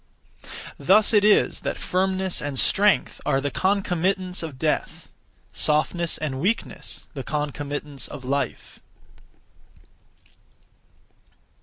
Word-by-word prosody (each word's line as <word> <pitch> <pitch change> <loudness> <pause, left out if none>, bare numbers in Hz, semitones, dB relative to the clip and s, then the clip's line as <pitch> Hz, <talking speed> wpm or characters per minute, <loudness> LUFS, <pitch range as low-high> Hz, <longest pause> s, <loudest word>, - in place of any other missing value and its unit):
Thus 205 +10 +5
it 210 -2 +5
is 210 0 +4
that - - -3
firmness 190 0 0
and 145 -2 -4
strength 205 +9 +3
are 135 - +2
the 140 0 -2
concomitants 185 -1 0
of 155 -5 -6
death; 155 +2 -2 0.5
softness 160 +3 +1
and 140 -4 -3
weakness, 215 +7 -2
the - - -5
concomitants 145 -1 -4
of 135 -3 -9
life. 140 +2 -3
165 Hz, 100 wpm, -24 LUFS, 145-190 Hz, 0.5 s, Thus